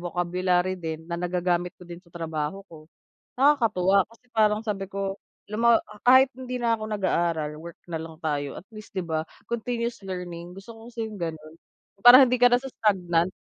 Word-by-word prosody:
vocabulary 180 +1 0
din 160 -1 -5
na, 170 +1 -5
nagagamit 180 0 -1
ko 180 - -14
din 175 0 -10
sa 180 - -25
trabaho 165 +2 -4
ko. 155 -4 -15 0.5
Nakakatuwa 215 -9 +4
kasi, 230 +2 -22
parang 210 -1 +3
sabi 200 -3 -4
ko 195 0 -3 0.3
"alam 210 +1 -5
mo, 235 - +6 0.2
ah, 210 - -14
kahit 260 +2 +7
hindi 255 -1 -5
na 230 -1 +2
ako 215 - -8
nag-aaral 170 -6 0
work 170 0 -10
na 170 - -5
lang 160 -1 -7
tayo" 145 -3 -3
at 190 - -19
least 215 0 -11
'di 185 -3 -4
ba, 160 -1 -1 0.2
continuous 235 -1 -3
learning, 175 -2 -6
gusto 195 +5 -11
ko 225 +2 -13
kasi, 225 -1 -4
'yong 215 - -9
gano'n. 160 -4 -6 0.5
Para 245 +2 +11
hindi 250 - +2
ka 245 0 +6
nasa-stagnant, 190 -9 +1
185 Hz, 185 wpm, -25 LUFS, 170-225 Hz, 0.5 s, Para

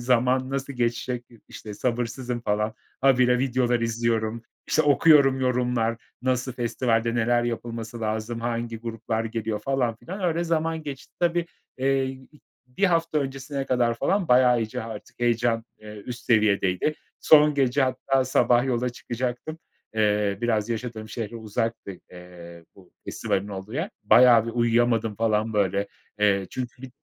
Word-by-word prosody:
zaman 125 +1 +2
nasıl 135 0 -3
geçecek 120 0 -2
diye 115 -2 -19
işte, 105 -1 -9
sabırsızım 120 +1 -2
falan, 105 -1 -1 0.3
habire 125 -2 +4
videolar 125 -2 +1
izliyorum. 115 -1 -1 0.2
İşte, 155 - +2
okuyorum, 145 -2 +5
yorumlar 125 -2 0 0.3
nasıl? 130 0 0
Festivalde 115 -1 0
neler 120 +1 +2
yapılması 115 -1 -5
lazım? 110 +1 -3
Hangi 115 0 -3
gruplar 115 -1 -3
geliyor 110 -1 -3
falan 125 -1 0
filan? 190 - -8
Öyle 170 -1 0
zaman 165 -1 -1
geçti. 145 -3 -8
Tabii, 175 0 +1 0.3
eee, 135 0 +2
i 130 +3 -10 0.3
1 125 +11 -2
hafta 165 -4 +2
öncesine 135 0 -4
kadar 120 -2 +1
falan 190 - 0
bayağı 125 -1 +5
iyice 110 0 -4
artık 115 0 -9
heyecan, 120 -1 +1
eee, 105 0 -11
üst 125 -1 -7
seviyedeydi. 105 +3 +2 0.3
Son 150 -1 +6
gece 135 0 +2
hatta, 130 +1 +1
sabah 125 -1 +3
yola 125 -1 0
çıkacaktım. 125 +5 -5 0.4
Eee, 105 -2 +1
biraz 110 -3 0
yaşadığım 115 -1 -4
şehre 115 0 -5
uzaktı, 115 0 -3 0.2
eee, 85 -2 -12
bu 95 -2 -19
festivalin 100 +1 -2
olduğu 95 +1 -7
yer. 165 +8 -2
Bayağı 115 0 +6
bir - - -2
uyuyamadım 115 -1 +1
falan 110 0 0
böyle. 100 -1 0 0.3
Eee, 100 -2 +2
çünkü 125 0 -6
bir 130 - -8
120 Hz, 145 wpm, -25 LUFS, 110-130 Hz, 0.4 s, Son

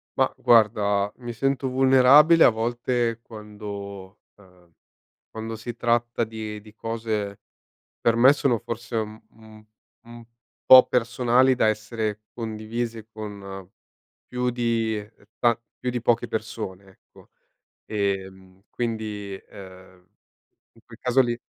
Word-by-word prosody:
Ma - - +1
guarda, 105 -3 +3
mi 120 -2 -7
sento 135 +3 -1
vulnerabile 135 +5 +6
a - - +8
volte 120 +1 -1
quando 105 -3 -9 0.2
ehm, 90 -4 -22 0.6
quando 110 0 -6
si 115 +1 -7
tratta 120 0 0
di 110 -1 -6
di 105 0 -16
cose 110 -3 -4 0.6
per 115 - +2
me 130 +4 +7
sono, 130 -5 +1
forse, 115 +2 -6
un 110 0 -4
un 110 -1 -17 0.4
un 120 0 -13 0.4
po' 130 0 +10
personali 125 +2 +2
da 110 - +2
essere 110 0 -2
condivise 110 0 -5
con 100 -4 -8 0.6
più 125 0 -2
di, 115 -2 0
uhm, 105 0 -15 0.2
ta 120 -1 +2 0.2
più 125 - -2
di 125 -1 -3
poche 120 0 +1
persone, 110 -4 -5
ecco. 95 - -22 0.6
Ehm, 95 -2 -4
quindi, 110 -4 -4
ehm, 95 -2 -14 0.7
in 115 - -22
quel 115 -1 -15
caso 125 +1 +2
lì 120 -2 +1
110 Hz, 125 wpm, -24 LUFS, 105-120 Hz, 0.7 s, po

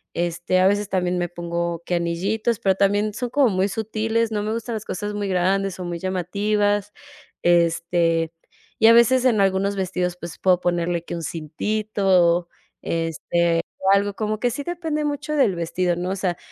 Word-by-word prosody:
Este, 175 +1 0
a 185 - +4
veces 205 0 0
también 180 -2 0
me 175 0 -1
pongo 170 0 -3
que - - -3
anillitos, 195 +7 -1
pero 195 - +2
también 205 +2 +1
son 245 +3 -3
como 270 0 +3
muy 190 -1 +1
sutiles, 220 +1 -1
no 210 -1 -1
me 215 +1 -2
gustan 230 +1 -4
las 215 - -6
cosas 205 +3 -4
muy 205 -1 -2
grandes 190 +1 0
o - - -4
muy 175 -1 -4
llamativas, 205 +3 0 0.5
este, 170 -1 +2 0.5
y 225 - +6
a 230 - +8
veces 240 +2 +5
en 235 -5 +3
algunos 195 +1 +1
vestidos, 180 -2 -2
pues, 170 -2 -8
puedo 185 -2 +3
ponerle 175 -1 0
que - - -6
un 170 - -5
cintito, 180 +2 +1 0.3
este, 165 +1 0 0.2
o 190 - +2
algo, 200 0 0
como 215 0 -2
que 245 - +1
sí 285 +5 -4
depende 325 -2 -3
mucho 290 +1 -3
del 260 -10 +3
vestido, 175 +1 -1
¿no? 175 +1 -3
O - - -1
sea, 185 -3 -2
190 Hz, 180 wpm, -22 LUFS, 175-215 Hz, 0.5 s, a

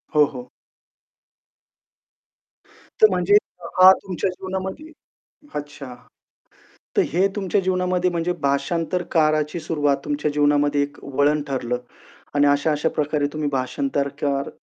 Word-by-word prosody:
हो, 150 -1 +6
हो. 125 0 -9 2.5
तर 215 - +8
म्हणजे, 185 +2 +2 0.4
हा 185 +1 +10
तुमच्या 190 0 -2
जीवनामध्ये 190 - -6 0.6
अच्छा. 145 -3 -7 1.0
तर - - +6
हे 190 +3 +3
तुमच्या 195 0 0
जीवनामध्ये 180 -1 0
म्हणजे 170 +1 -1
भाषांतरकाराची 155 +2 0
सुरुवात 145 -3 0
तुमच्या 150 0 -1
जीवनामध्ये 145 0 +2
एक 145 0 -8
वळण 145 +2 +1
ठरलं. 125 -3 -2 0.6
आणि 145 0 +4
अशा-अशा 145 +2 +1
प्रकारे 150 -1 -1
तुम्ही 155 -2 -2
भाषांतरकार 140 - -2
150 Hz, 105 wpm, -22 LUFS, 145-180 Hz, 2.5 s, हा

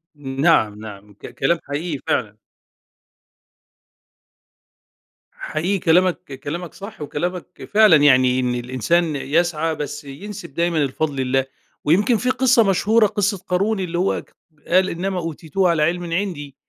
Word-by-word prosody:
نَعَم 135 -6 +1
نَعَم 105 -1 -11
ك 100 - -11
كلام 165 +5 0
حقيقي 145 +1 -4
فعلًا. 105 -3 -1 2.9
حقيقي 180 +6 -2
كلامك 180 +2 +3 0.3
كلامك 170 +3 -5
صح، 200 -3 -10
وكلامك 175 +5 -5
فعلًا 215 -5 +7
يعني 130 -3 +4
إن 125 -1 0
الإنسان 130 +7 0
يسعى 160 +3 0
بس 150 -1 -5
ينسب 145 +3 -9
دايمًا 170 0 0
الفضل 140 +2 -2
لله، 130 +1 +1 0.4
ويمكن 205 - +3
في 250 - -1
قِصّة 255 -2 +4
مشهورة 215 +3 +3
قِصّة 205 0 0
قارون 195 +4 -1
اللي 175 -2 -3
هو 185 +2 0
ك - - -26 0.3
قال: 185 +2 +3
"إِنَّمَا 185 +2 -3
أُوتِيتُهُ 165 +2 -1
عَلَىٰ 165 -3 +2
عِلْمٍ 175 +3 0
عِندِي" 165 -7 -3
170 Hz, 130 wpm, -21 LUFS, 140-190 Hz, 2.9 s, فعلًا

